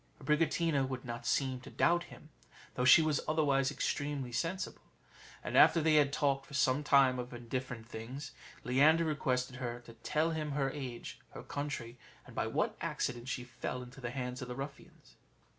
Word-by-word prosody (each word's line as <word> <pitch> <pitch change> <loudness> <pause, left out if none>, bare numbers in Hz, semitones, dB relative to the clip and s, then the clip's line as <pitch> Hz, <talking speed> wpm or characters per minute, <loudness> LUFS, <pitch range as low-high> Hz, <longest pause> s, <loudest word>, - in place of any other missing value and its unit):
Abricotina 150 0 +2
would 130 -1 -5
not 120 -1 -5
seem 130 -2 +1
to - - -10
doubt 175 0 +2
him, 155 - -14 0.4
though 125 - 0
she 160 +5 +8
was 155 -2 +1
otherwise 140 -4 +2
extremely 145 -3 -2
sensible. 170 +8 -3 0.6
And - - -4
after 170 - +7
they 160 0 +3
had 145 -2 +4
talked 140 -2 0
for 140 - -8
some 135 +1 +2
time 135 -3 +5
of 125 0 -5
indifferent 120 -1 -5
things, 125 +5 -7 0.3
Leander 150 +6 +4
requested 130 -4 -1
her 120 -2 -4
to 120 -1 -13
tell 155 +7 0
him 155 -2 -2
her 135 -2 0
age, 130 -5 -6 0.2
her - - -7
country, 130 -5 -5 0.3
and - - -13
by - - 0
what - - 0
accident 120 0 -2
she 125 - -2
fell 125 0 -5
into 125 +2 -12
the 120 - -3
hands 125 0 -4
of 125 - -5
the 125 - -5
ruffians. 140 +1 -9
135 Hz, 175 wpm, -33 LUFS, 125-150 Hz, 0.6 s, she